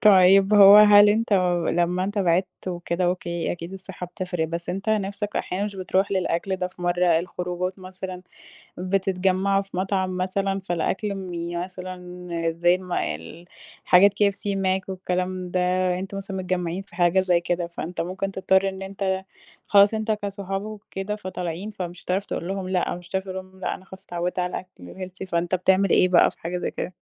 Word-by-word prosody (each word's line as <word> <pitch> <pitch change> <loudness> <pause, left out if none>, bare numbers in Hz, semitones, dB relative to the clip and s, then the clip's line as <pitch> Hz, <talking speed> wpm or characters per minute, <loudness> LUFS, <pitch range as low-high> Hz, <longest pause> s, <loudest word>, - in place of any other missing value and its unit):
طيب 195 0 +6
هو 200 0 +10
هل 205 -1 +8
أنت 220 +1 +1 0.4
لمّا 175 +2 +1
أنت 205 +1 -3
بعدت 185 +1 0
وكده 175 0 -2
أوكي، 175 -2 -1
أكيد 170 +1 -7
الصحة 185 -1 -8
بتفرق 180 -1 -3
بس 170 +1 -5
أنت 195 +4 -4
نفسك 205 0 -2
أحيانًا 195 +3 -2
مش 200 -2 -5
بتروح 190 +2 0
للأكل 190 0 0
ده 180 - -2
في 180 - -13
مرّة 175 -1 +3
الخروجات 180 +1 -4
مثلًا 185 0 -8 0.6
بتتجمعوا 190 +1 +1
في 195 -2 -9
مطعم 190 -1 -1
مثلًا 195 +1 -1
فالأكل 190 +3 -2
مي 175 -3 -5
يعني 175 0 -2
مثلًا 180 -1 -8 0.2
زي 175 +2 +3
مال 170 - -4 0.4
حاجات 195 +2 +6
KFC، 200 -1 +1 0.2
Mac 190 0 0
والكلام 185 -1 -3
ده 185 - +1 0.4
أنتم 195 +1 -5
مثلًا 195 -1 -5
متجمعين 180 0 -2
في 195 -3 -17
حاجة 175 +1 +3
زيّ 180 -2 +3
كده 175 0 -2
فأنت 170 +1 -5
ممكن 190 +3 -3
تضطر 190 0 +2
إن 190 0 -8
أنت 190 -1 -2 0.4
خلاص 200 +1 +6
أنت 220 0 -1
كصحاب 200 -2 -3
وكده 210 -1 -5
فطالعين 185 0 -5
فمش 180 -3 -7
هتعرف 190 +2 -1
تقول 170 - -4
لهُم 195 -1 -3
لأ 185 -2 0
مش 175 0 -12
هتعرف 190 0 -2
لهُم 185 0 -8
لأ 180 - -2
أنا 185 - -15
خلاص 190 0 -12
اتعودت 175 +1 -3
على 180 0 0
الأكل 180 - -8
الhealthy 185 +1 -9
فأنت 170 +2 0
بتعمل 190 +2 +3
إيه 185 - +4
بقى 175 - +5
في - - -25
حاجة 175 +2 -3
زي - - -3
كده؟ 180 - -5
185 Hz, 175 wpm, -24 LUFS, 180-195 Hz, 0.6 s, هو